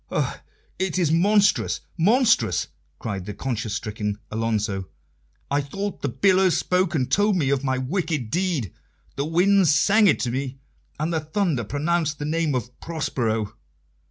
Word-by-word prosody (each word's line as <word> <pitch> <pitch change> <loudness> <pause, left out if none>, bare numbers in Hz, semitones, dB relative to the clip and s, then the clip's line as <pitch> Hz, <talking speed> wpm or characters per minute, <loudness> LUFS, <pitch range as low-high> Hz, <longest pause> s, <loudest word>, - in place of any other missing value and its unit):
"Oh, - - -1 0.4
it 190 -2 -1
is 170 -4 +2
monstrous, 200 +5 +3
monstrous!" 225 - +3 0.3
cried 100 -2 -5
the 105 - -5
conscience 115 -5 -3
stricken 105 -2 -3
Alonso. 105 -4 -1 0.6
"I 145 +1 +2
thought 195 +8 -5
the 140 - -1
billows 185 +8 +3
spoke 180 -2 +1
and 130 -4 +1
told 205 0 +3
me 145 -7 +1
of 140 -1 0
my 130 -1 0
wicked 150 - -2
deed, 170 - -1 0.4
the 140 - -1
winds 180 +3 +4
sang 210 +7 +5
it 170 - +3
to 120 - -1
me, 130 +1 -3 0.4
and 160 +3 -1
the 160 - +1
thunder 155 - -1
pronounced 155 +5 -1
the 145 - -4
name 155 -2 0
of 125 0 -5
'Prospero. 115 -10 -2
150 Hz, 155 wpm, -24 LUFS, 120-185 Hz, 0.6 s, sang